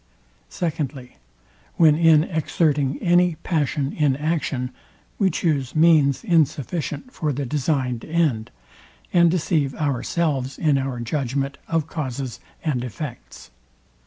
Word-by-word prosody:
Secondly, 140 Hz, -, -4 dB, 0.6 s
When 160 Hz, -2 st, +6 dB
in 160 Hz, -1 st, +5 dB
exerting 150 Hz, -4 st, 0 dB
any 175 Hz, -1 st, +4 dB
passion 145 Hz, -4 st, 0 dB
in 145 Hz, -3 st, +2 dB
action, 150 Hz, -5 st, -1 dB, 0.5 s
we 195 Hz, -3 st, +4 dB
chuse 150 Hz, -6 st, -1 dB
means 155 Hz, -, +4 dB
insufficient 165 Hz, -, 0 dB
for 155 Hz, -2 st, -1 dB
the 140 Hz, +1 st, -3 dB
designed 130 Hz, -3 st, -1 dB
end, 155 Hz, -9 st, 0 dB, 0.6 s
and 170 Hz, -1 st, +6 dB
deceive 155 Hz, -5 st, 0 dB
ourselves 140 Hz, -1 st, -1 dB
in 150 Hz, -4 st, +2 dB
our 130 Hz, -2 st, -3 dB
judgment 135 Hz, +2 st, -2 dB
of 165 Hz, -2 st, 0 dB
causes 130 Hz, -, -5 dB, 0.2 s
and 135 Hz, -6 st, -1 dB
effects. 125 Hz, +2 st, -8 dB
150 Hz, 110 wpm, -23 LUFS, 135-165 Hz, 0.6 s, When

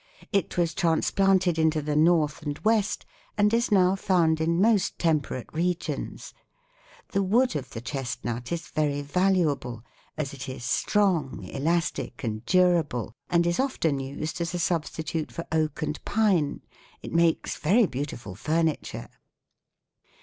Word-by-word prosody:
It 195 Hz, -3 st, 0 dB
was 170 Hz, -2 st, +1 dB
transplanted 180 Hz, +1 st, +2 dB
into 160 Hz, -1 st, +3 dB
the 150 Hz, 0 st, -2 dB
North 155 Hz, -1 st, +3 dB
and 145 Hz, -2 st, -4 dB
West, 215 Hz, -2 st, +1 dB, 0.3 s
and 210 Hz, +1 st, +3 dB
is 235 Hz, 0 st, +1 dB
now 185 Hz, -2 st, +4 dB
found 170 Hz, -5 st, +2 dB
in 170 Hz, +1 st, +1 dB
most 210 Hz, -1 st, +3 dB
temperate 155 Hz, -6 st, -1 dB
regions. 175 Hz, +2 st, -3 dB, 0.8 s
The 200 Hz, -, 0 dB
wood 225 Hz, +4 st, +2 dB
of 135 Hz, -4 st, -4 dB
the 115 Hz, -, -7 dB
chestnut 125 Hz, -2 st, -4 dB
is 170 Hz, -2 st, -4 dB
very 145 Hz, -2 st, 0 dB
valuable, 150 Hz, -, 0 dB, 0.3 s
as 145 Hz, -3 st, -3 dB
it 135 Hz, -1 st, -7 dB
is 130 Hz, -2 st, -7 dB
strong, 180 Hz, -5 st, +1 dB
elastic 160 Hz, -2 st, -2 dB
and 110 Hz, -1 st, -3 dB
durable, 170 Hz, -, +2 dB, 0.2 s
and 170 Hz, -1 st, +3 dB
is 175 Hz, 0 st, 0 dB
often 165 Hz, -, 0 dB
used 140 Hz, +5 st, -4 dB
as 170 Hz, +1 st, -2 dB
a -, -, 0 dB
substitute 160 Hz, -2 st, -2 dB
for 170 Hz, -, -6 dB
oak 155 Hz, -1 st, 0 dB
and 150 Hz, 0 st, -4 dB
pine. 200 Hz, -9 st, +1 dB, 0.4 s
It -, -, -7 dB
makes 170 Hz, -1 st, +2 dB
very 210 Hz, +9 st, +4 dB
beautiful 125 Hz, -, -5 dB
furniture." 160 Hz, -, -1 dB
165 Hz, 140 wpm, -26 LUFS, 145-180 Hz, 0.8 s, now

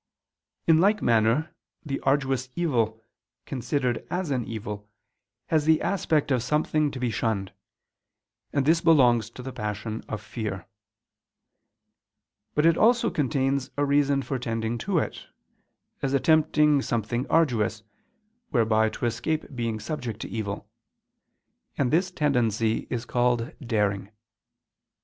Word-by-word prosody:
_ -, -, -62 dB, 0.6 s
In 160 Hz, -1 st, +5 dB
like 205 Hz, +4 st, +3 dB
manner 115 Hz, +7 st, +2 dB, 0.3 s
the 135 Hz, -2 st, -2 dB
arduous 135 Hz, -2 st, 0 dB
evil, 115 Hz, -10 st, 0 dB, 0.4 s
considered 125 Hz, -1 st, -1 dB
as 180 Hz, -4 st, -2 dB
an 125 Hz, -4 st, 0 dB
evil, 105 Hz, -2 st, -6 dB, 0.6 s
has 155 Hz, -2 st, +1 dB
the 160 Hz, 0 st, +5 dB
aspect 160 Hz, -7 st, 0 dB
of 125 Hz, -2 st, +2 dB
something 150 Hz, +3 st, +1 dB
to 140 Hz, -, -7 dB
be 125 Hz, -2 st, 0 dB
shunned; 105 Hz, -4 st, -2 dB, 1.0 s
and 140 Hz, -2 st, +1 dB
this 165 Hz, +3 st, +4 dB
belongs 125 Hz, -9 st, +4 dB
to 125 Hz, +2 st, -10 dB
the 130 Hz, 0 st, -6 dB
passion 105 Hz, +1 st, -4 dB
of 105 Hz, -, -3 dB
fear: 105 Hz, -3 st, -5 dB, 1.9 s
but 150 Hz, -, +3 dB
it 165 Hz, -1 st, +5 dB
also 235 Hz, +2 st, +4 dB
contains 135 Hz, -2 st, 0 dB
a 145 Hz, -, +2 dB
reason 140 Hz, -1 st, +2 dB
for 130 Hz, +1 st, -3 dB
tending 115 Hz, 0 st, -2 dB
to 195 Hz, +4 st, -1 dB
it, -, -, -2 dB, 0.7 s
as 135 Hz, 0 st, 0 dB
attempting 150 Hz, 0 st, +4 dB
something 120 Hz, +1 st, -2 dB
arduous, 115 Hz, -8 st, +1 dB, 0.7 s
whereby 110 Hz, -1 st, +3 dB
to 120 Hz, -, -4 dB
escape 135 Hz, +5 st, -2 dB
being 115 Hz, -2 st, -2 dB
subject 115 Hz, -2 st, -5 dB
to -, -, -5 dB
evil; 100 Hz, -3 st, -4 dB, 1.1 s
and 130 Hz, -3 st, +1 dB
this 180 Hz, +4 st, +2 dB
tendency 115 Hz, -, 0 dB
is 120 Hz, -1 st, -3 dB
called 120 Hz, +1 st, +1 dB
_daring. 105 Hz, -5 st, 0 dB
125 Hz, 130 wpm, -26 LUFS, 115-150 Hz, 1.9 s, In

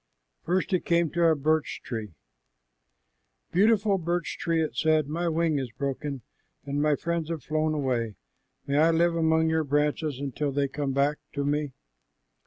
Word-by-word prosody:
First 185 Hz, +3 st, -1 dB
it 180 Hz, -, +2 dB
came 170 Hz, -2 st, +2 dB
to 170 Hz, 0 st, +1 dB
a 160 Hz, -1 st, +5 dB
birch 155 Hz, +2 st, 0 dB
tree. 110 Hz, -7 st, -5 dB, 1.4 s
"Beautiful 205 Hz, 0 st, +3 dB
birch 175 Hz, 0 st, -2 dB
tree," 165 Hz, -1 st, 0 dB
it 155 Hz, -7 st, -1 dB
said, 155 Hz, +2 st, +2 dB
"my 170 Hz, +3 st, -1 dB
wing 160 Hz, -2 st, +1 dB
is 130 Hz, -2 st, -4 dB
broken, 140 Hz, 0 st, -4 dB, 0.4 s
and 140 Hz, +1 st, -1 dB
my 150 Hz, 0 st, +3 dB
friends 170 Hz, 0 st, -2 dB
have 165 Hz, -3 st, -4 dB
flown 155 Hz, 0 st, 0 dB
away. 120 Hz, -7 st, -1 dB, 0.5 s
May 140 Hz, +1 st, +1 dB
I 160 Hz, +2 st, +5 dB
live 170 Hz, +1 st, +3 dB
among 160 Hz, 0 st, +3 dB
your 160 Hz, 0 st, +2 dB
branches 145 Hz, 0 st, 0 dB, 0.2 s
till 145 Hz, -2 st, -1 dB
they 140 Hz, 0 st, +1 dB
come 140 Hz, 0 st, -3 dB
back 140 Hz, +2 st, +1 dB
to 140 Hz, 0 st, -2 dB
me?" 145 Hz, -1 st, -1 dB
155 Hz, 165 wpm, -27 LUFS, 140-165 Hz, 1.4 s, a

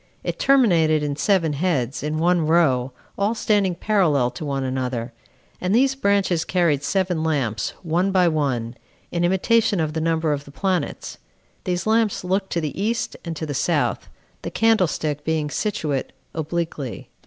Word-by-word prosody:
It -, -, -4 dB
terminated 170 Hz, -, +4 dB
in 145 Hz, -1 st, -2 dB
seven 165 Hz, -1 st, +2 dB
heads, 140 Hz, -5 st, -1 dB
in 150 Hz, +1 st, -2 dB
one 170 Hz, -1 st, +2 dB
row, 135 Hz, -6 st, +3 dB, 0.3 s
all 205 Hz, +3 st, +1 dB
standing 205 Hz, -5 st, +1 dB
parallel 165 Hz, -, +2 dB
to 165 Hz, -, -8 dB
one 140 Hz, -2 st, -2 dB
another; 130 Hz, -2 st, -3 dB, 0.5 s
and 185 Hz, +3 st, +1 dB
these 265 Hz, +2 st, +4 dB
branches 200 Hz, -9 st, +1 dB
carried 170 Hz, -6 st, +1 dB
seven 180 Hz, +2 st, 0 dB
lamps, 130 Hz, -9 st, -1 dB
one 175 Hz, +3 st, +1 dB
by 185 Hz, -2 st, +4 dB
one, 135 Hz, -8 st, -1 dB, 0.4 s
in 175 Hz, 0 st, -1 dB
imitation 200 Hz, +3 st, +2 dB
of 155 Hz, -1 st, -1 dB
the 160 Hz, -, -2 dB
number 160 Hz, -1 st, +1 dB
of 145 Hz, 0 st, -4 dB
the 140 Hz, -, -12 dB
planets. 185 Hz, +3 st, -2 dB, 0.5 s
These 180 Hz, -1 st, -1 dB
lamps 220 Hz, -2 st, +1 dB
looked 190 Hz, +2 st, -1 dB
to 170 Hz, -, 0 dB
the 155 Hz, +4 st, -4 dB
east 225 Hz, +2 st, -1 dB
and 170 Hz, -2 st, -5 dB
to 160 Hz, -, -4 dB
the 145 Hz, -, -4 dB
south, -, -, 0 dB, 0.3 s
the -, -, -4 dB
candlestick 175 Hz, -9 st, +1 dB
being 155 Hz, -2 st, -1 dB
situate 155 Hz, -10 st, -2 dB, 0.2 s
obliquely. 160 Hz, -5 st, -4 dB
165 Hz, 160 wpm, -22 LUFS, 145-190 Hz, 0.5 s, terminated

